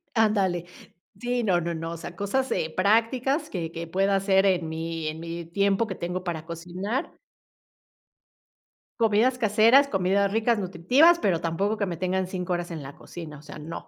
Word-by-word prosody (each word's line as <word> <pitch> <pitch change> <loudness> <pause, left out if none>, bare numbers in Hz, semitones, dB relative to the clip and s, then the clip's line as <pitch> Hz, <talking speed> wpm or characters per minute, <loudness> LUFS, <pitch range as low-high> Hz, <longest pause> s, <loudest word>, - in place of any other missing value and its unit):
Ándale. 200 -6 +2 0.5
Sí, 245 0 -1
no, 180 -5 +2
no, 170 +1 -2
no, 165 0 -4
o 170 - -6
sea, 175 - -8
cosas 260 +8 -1
eh, 160 0 -1
prácticas 230 - +2
que 165 -3 -4
que 165 0 -5
pueda 195 +3 +1
hacer 195 0 +3
en 180 -4 +2
mi 165 0 -4
en 155 +1 -4
mi 170 0 -6
tiempo 200 +5 +1
que 190 - -5
tengo 180 +1 -4
para 165 -3 -4
cocinar 180 - -4 1.9
comidas 230 +3 +3
caseras, 230 +5 +5
comidas 195 -1 +1
ricas, 225 +1 +2
nutritivas, 245 - +4
pero 180 - +1
tampoco 195 +6 -1
que 200 - 0
me 170 -3 -4
tengan 185 0 -1
5 180 -1 -3
horas 175 0 -3
en 155 -4 -6
la 135 +1 -9
cocina, 160 -4 -9
o - - -15
sea, 150 0 -10
no. 155 +2 -8
185 Hz, 175 wpm, -26 LUFS, 170-215 Hz, 1.9 s, caseras